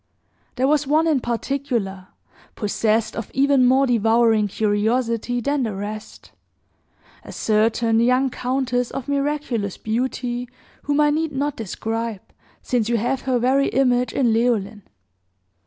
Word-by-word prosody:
"There 260 +1 +1
was 295 -1 +2
one, 310 +3 +3
in 310 -4 +2
particular, 235 -6 -3 0.5
possessed 215 +1 0
of 230 - -5
even 270 -1 +4
more 265 +2 +4
devouring 225 -2 +3
curiosity 225 +4 0
than 285 +3 0
the 220 -5 -2
rest, 210 +2 -7 0.9
a - - -10
certain 225 +1 +1
young 250 +3 +2
countess 250 -1 -1
of 270 - -6
miraculous 280 -8 -2
beauty, 245 +1 -3 0.4
whom 290 +1 +1
I 295 0 +4
need 315 0 -1
not 280 +1 -1
describe, 225 0 -4 0.4
since 235 -3 0
you 235 - +2
have 245 +4 -1
her 255 - +3
very 260 +3 +2
image 250 -2 +1
in 240 -5 +2
Leoline. 220 -3 0
245 Hz, 130 wpm, -22 LUFS, 225-270 Hz, 0.9 s, even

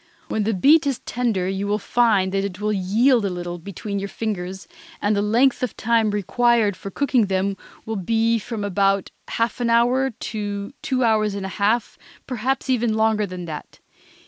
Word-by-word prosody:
When 215 -2 -1
the 220 -1 +1
beet 295 - +5
is 270 -3 0
tender 225 -7 -1
you 195 +1 -2
will 205 +1 +1
find 215 -4 +2
that 195 0 0
it 195 -2 -5
will 210 0 0
yield 220 +6 +3
a 200 - 0
little, 175 -1 -5
between 200 +3 -5
your 200 0 -4
fingers, 190 -4 -4 0.3
and 205 +1 +1
the 200 - +1
length 235 +6 +3
of 250 -4 -3
time 230 -1 +2
required 210 +1 +2
for 195 - -8
cooking 250 -1 +1
them 195 +1 0 0.3
will 220 -1 -3
be 225 +4 +1
from 220 -1 -5 0.6
half 230 +2 -1
an 235 - +1
hour 245 +3 +3
to 205 -1 -5
two 260 -1 0
hours 215 -3 +2
and 200 -1 -4
a - - -4
half, 210 +4 0 0.3
perhaps 260 +2 -2
even 240 -4 +1
longer 220 -1 +2
than 180 -1 -7
that. 155 -3 -8
215 Hz, 180 wpm, -22 LUFS, 195-235 Hz, 0.6 s, beet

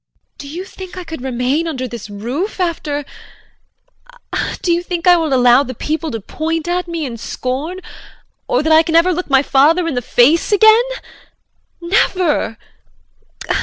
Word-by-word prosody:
Do 285 - -8
you 345 +6 -6
think 375 -1 -10
I 365 - -5
could 320 -5 -8
remain 260 +5 -1
under 260 -5 -3
this 235 -3 -8
roof 245 - -4
after 310 -5 -2 1.6
Do 345 - +2
you 340 - 0
think 350 -1 -4
I 360 -1 +7
will 325 -3 -1
allow 250 0 +5
the 255 -3 -5
people 315 +6 -3
to 225 - -4
point 320 - -3
at 355 0 -1
me 335 -3 -3
in 235 -3 -6
scorn, 275 +11 -4 0.7
or 255 - +1
that 315 +1 +3
I 315 - +7
can 325 0 -2
ever 350 +2 +4
look 360 0 -4
my 270 0 +4
father 315 +6 +3
in 330 - -2
the 245 - -1
face 270 - +3
again? 440 +2 +6 1.0
Never! 345 - +1
320 Hz, 165 wpm, -17 LUFS, 260-350 Hz, 1.6 s, I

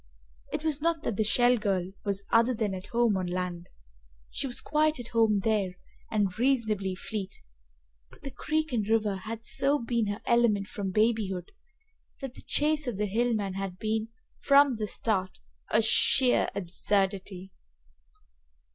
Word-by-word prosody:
It - - -3
was 305 -2 -1
not 330 -1 0
that 225 - -2
the 220 - +1
Shell 245 +3 +3
girl 190 -3 -1
was 200 -1 -2
other 235 +2 +4
than 215 -3 -1
at 185 +1 -6
home 235 -3 +2
on 185 -1 -2
land. 180 -1 -4 0.6
She 275 - -2
was 245 - -1
quite 305 -1 +1
at 240 - -4
home 220 -3 +2
there 205 -5 0 0.3
and 205 -2 -1
reasonably 220 -7 +1
fleet, 195 0 -5 0.7
but - - -19
the 275 - -6
creek 310 +3 -2
and 215 -3 -1
river 215 -3 +2
had 225 +4 -7
so 280 +2 +3
been 235 -3 -1
her 205 +1 -3
element 235 -4 +3
from 195 -1 -4
babyhood 210 -3 0 0.7
that 270 -3 -6
the - - -13
chase 300 -1 +1
of 235 -5 -2
the 210 - 0
hill 230 +4 +1
man 200 -3 -2
had 195 -1 -5
been, 220 +2 -1 0.3
from 280 -3 +5
the 215 -1 -2
start, 190 -4 -1 0.3
a 225 - +3
sheer 250 +3 +4
absurdity. 190 0 -2
215 Hz, 160 wpm, -28 LUFS, 195-245 Hz, 0.7 s, from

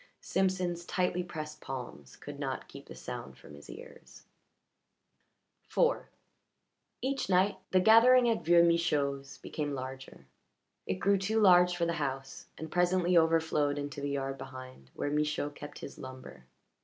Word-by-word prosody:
Simpson's 185 -2 0
tightly 180 0 0
pressed 155 -3 -7
palms 125 - -7
could - - -10
not - - -4
keep - - -12
the - - -10
sound 65 0 -8
from - - -14
his 70 0 -13
ears. - - -12 1.5
IV - - +1 1.0
Each 270 -5 -1
night 190 +2 +3
the 185 - +4
gathering 240 +5 +6
at 230 -2 0
Vieux 170 +1 +6
Michaud's 145 -5 0
became 145 -2 -4
larger; 130 0 -8 0.6
it 95 - 0
grew 200 - +2
too 215 +4 0
large 180 -3 +6
for 170 - +1
the 170 - 0
house, 135 -1 -4
and 160 -1 -7
presently 180 0 +2
overflowed 160 -3 +2
into 145 -1 -5
the 140 - -2
yard 135 -1 -3
behind, 130 - -10
where 145 - -2
Michaud 150 -1 0
kept 145 0 -10
his - - -9
lumber. 130 - -10
155 Hz, 145 wpm, -31 LUFS, 135-180 Hz, 1.5 s, gathering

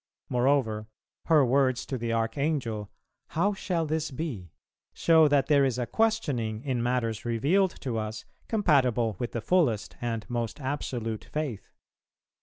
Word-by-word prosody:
Moreover, 125 -4 +1 0.4
her 155 -4 +5
words 130 0 +2
to 135 - -4
the 115 -2 -2
Archangel, 115 -2 -1 0.5
"How 200 +5 +3
shall 175 -4 -1
this 155 0 -1
be?" 130 - -5 0.5
show 160 -2 +5
that 145 -2 +3
there 145 -2 +4
is 130 -3 +1
a 125 - -1
questioning 135 - 0
in 130 -4 -1
matters 120 -3 -1
revealed 150 - +1
to 120 -5 -2
us 110 +1 -5 0.2
compatible 130 - +2
with 120 - -3
the 115 - -2
fullest 135 - +1
and 115 -3 -3
most 120 0 -3
absolute 125 -5 -3
faith. 140 -10 -4
125 Hz, 140 wpm, -28 LUFS, 115-150 Hz, 0.5 s, her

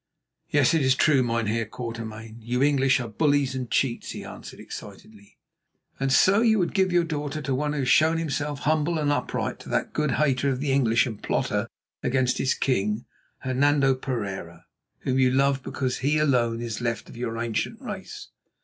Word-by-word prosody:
"Yes, 145 +1 +3
it 165 - +3
is 130 -1 +3
true, 140 -1 +4
Mynheer 115 -2 0
Quatermain. 115 -1 -7
You 125 +3 0
English 135 -2 +3
are 120 - -4
bullies 145 +3 +1
and 130 -2 -4
cheats," 125 -4 0
he - - -7
answered - - -10
excitedly. 105 -1 -11 0.6
"And 135 0 0
so 190 - +5
you 225 -2 +4
would 175 -4 0
give 190 -2 +2
your 175 -1 +3
daughter 150 -2 -3
to 135 - -1
one 150 +3 -1
who 145 - -1
has 130 - -2
shown 160 +4 +4
himself 145 -3 -2
humble 155 +2 +1
and 150 -2 +1
upright, 145 - -2
to - - -11
that - - -1
good 150 -4 0
hater 140 -1 +1
of 130 -2 -1
the 140 0 -1
English 130 -2 +3
and 110 -5 -6
plotter - - -1 0.3
against 130 0 +1
his 135 - +1
King, 105 -3 0 0.4
Hernando 135 +1 +3
Pereira, 100 -10 -5 0.4
whom 130 0 0
you 130 -1 +5
love 135 +1 +2
because 130 -1 -3
he 145 +4 +1
alone 120 -6 +2
is 115 0 -4
left 120 -1 -2
of - - -12
your 115 -1 -4
ancient 115 -1 -2
race." - - -8
130 Hz, 185 wpm, -25 LUFS, 120-145 Hz, 0.6 s, so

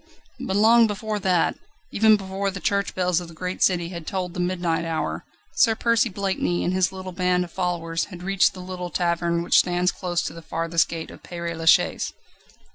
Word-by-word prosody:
But 190 - -3
long 225 +2 +6
before 210 0 -3
that, 185 -3 +1 0.3
even 215 0 +5
before 195 0 -3
the 195 0 -6
church 200 +1 -1
bells 180 -1 +1
of 175 - -8
the 165 - -13
great 180 +2 -5
city 175 -2 +2
had 170 -3 -8
tolled 180 -2 -3
the 180 - -6
midnight 175 -2 0
hour, 165 -1 -3 0.3
Sir 225 -2 +4
Percy 230 +1 +2
Blakeney 190 -2 -1
and 180 - 0
his 185 -1 +2
little 185 -1 -7
band 180 0 +1
of 175 - -9
followers 170 -3 -2
had 180 -3 -11
reached 195 0 +2
the 185 - -8
little 180 -1 -6
tavern 170 -1 0
which - - +5
stands 180 0 +1
close 175 -2 -2
to - - -4
the 165 - -10
farthest 165 +1 0
gate 165 -1 -6
of - - -13
Père 170 -1 -5
Lachaise. 165 0 +2
180 Hz, 200 wpm, -24 LUFS, 170-195 Hz, 0.3 s, long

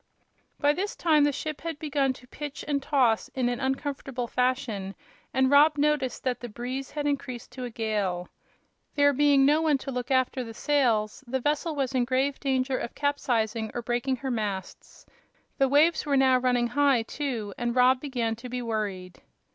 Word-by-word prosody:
By 290 0 +3
this 395 +5 -3
time 305 -4 +3
the 290 - +2
ship 305 +2 -5
had 330 -2 -4
begun 285 -3 0
to 250 0 -16
pitch 290 +2 -7
and 285 -2 0
toss 255 -6 +2
in 250 -2 +1
an 245 0 -2
uncomfortable 270 -1 -3
fashion, 240 -6 -1 0.4
and 265 0 +2
Rob 295 +2 +6
noticed 290 -3 0
that 255 -2 -1
the 240 - -7
breeze 255 +4 -5
had 295 -1 -4
increased 260 -4 -3
to 250 0 -6
a - - -5
gale. 205 -6 -2 0.7
There 285 0 +4
being 280 0 +4
no 300 +3 +4
one 310 -3 +3
to 270 +1 -6
look 250 -1 -4
after 260 -1 +1
the 225 -1 -9
sails, 235 -7 +1
the 260 +2 -1
vessel 300 +4 -1
was 270 -2 -1
in 250 -2 +2
grave 270 +2 0
danger 260 -1 0
of - - -6
capsizing 230 -6 0
or 240 - -3
breaking 245 +3 0
her 265 +1 -4
masts. 205 -5 -5 0.5
The 270 -1 +4
waves 310 +4 +4
were 285 -2 +1
now 260 -1 +4
running 245 -1 +2
high, 275 -2 +3
too, 230 -6 -4
and 240 0 -2
Rob 255 +1 +4
began 240 -6 -2
to 250 +2 -9
be 250 0 -4
worried. 205 -5 -4
260 Hz, 185 wpm, -27 LUFS, 240-285 Hz, 0.7 s, Rob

